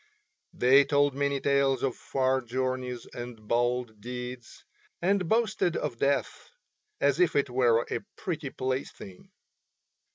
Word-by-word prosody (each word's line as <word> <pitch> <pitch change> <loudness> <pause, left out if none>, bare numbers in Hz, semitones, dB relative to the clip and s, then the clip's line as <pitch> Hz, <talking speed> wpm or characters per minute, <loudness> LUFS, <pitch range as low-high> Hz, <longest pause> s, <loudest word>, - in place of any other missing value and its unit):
They 135 +3 +5
told 145 0 +2
many 140 0 0
tales 140 -1 +2
of 130 -3 0
far 130 0 0
journeys 125 0 -3
and 120 -3 -8
bold 120 -2 0
deeds, 125 +1 -7 0.3
and 185 -1 +1
boasted 220 -6 +1
of 125 -6 -3
death 140 0 -1 0.5
as - - +2
if 365 - +3
it 140 -2 +1
were 120 -2 +3
a - - 0 0.2
pretty 160 -6 -4
plaything. 130 -8 -5
130 Hz, 125 wpm, -28 LUFS, 125-140 Hz, 0.5 s, They